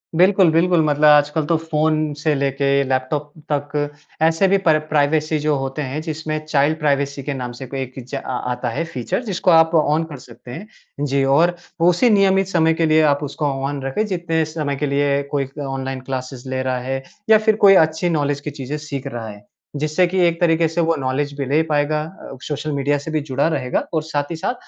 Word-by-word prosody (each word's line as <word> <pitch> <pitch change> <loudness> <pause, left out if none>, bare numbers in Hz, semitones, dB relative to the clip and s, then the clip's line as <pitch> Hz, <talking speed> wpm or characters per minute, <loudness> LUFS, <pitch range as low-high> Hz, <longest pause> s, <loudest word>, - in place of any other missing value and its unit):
बिल्कुल, 185 0 +5
बिल्कुल। 170 +1 +3
मतलब 150 0 +2
आजकल 150 +1 +4
तो 165 - +1
फ़ोन 155 -1 0
से 155 0 0
लेके 140 0 -1 0.2
लैपटॉप 140 +3 -1 0.2
तक 145 0 -1 0.3
ऐसे 165 +4 +3
भी 195 +1 +3
पर 155 - +6
प्राइवेसी 155 +1 +1
जो 150 0 +1
होते 135 +2 -4
हैं 140 +3 -4
जिसमें 155 -1 -4
चाइल्ड 155 +1 +1
प्राइवेसी 140 -2 0
के 145 - -3
नाम 125 -2 -5
से 130 - -6
भी 135 - -3
एक 130 -1 -6
इजा 130 +2 -5
आ 125 - -2
आता 125 0 -3
है 165 +9 -2
फीचर, 130 - -3
जिसको 190 -3 0
आप 160 0 +5
ऑन 155 +1 +2
कर 145 - -7
सकते 120 0 -13
हैं। 190 +12 -8 0.4
जी, 140 0 +1
और 165 +6 +3 0.3
उसी 180 +8 +4
नियमित 195 -2 +3
समय 160 -3 +2
के 165 0 0
लिए 155 0 +4
आप 145 +1 -5
उसको 145 +1 -4 0.2
ऑन 140 0 -3
रखें 135 +12 -1
जितने 170 -4 -1
समय 155 -3 -3
के 145 +2 -2
लिए 140 0 +1
कोई 140 -2 -1 0.2
ऑनलाइन 135 -1 -4
क्लासेज़ 130 0 -6
ले 130 0 -2
रहा 130 -1 -1
है 135 +1 -4 0.3
या 220 - +8
फिर 215 0 +2
कोई 195 - +9
अच्छी 160 +2 -2
नॉलेज 145 -3 0
की 150 - -5
चीज़ें 140 +1 -5
सीख 145 -3 -6
रहा 115 -1 -6
है। 105 0 -12 0.3
जिससे 155 +5 +1
कि 185 +1 -1
एक 170 0 -1
तरीके 165 -1 +3
से 165 +2 -1
वो 165 0 +2
नॉलेज 140 +2 -2
भी 140 - -2
ले 145 +4 +2
पाएगा 150 +1 +1
अ, 155 -5 -11
सोशल 150 +1 -3
मीडिया 145 +1 0
से 155 +3 -7
भी 155 -1 0
जुड़ा 140 +4 +1
रहेगा 130 -6 -1
और 155 -1 0
साथ 145 0 -3
ही - - -2
साथ 160 - -2
150 Hz, 215 wpm, -20 LUFS, 135-160 Hz, 0.4 s, कोई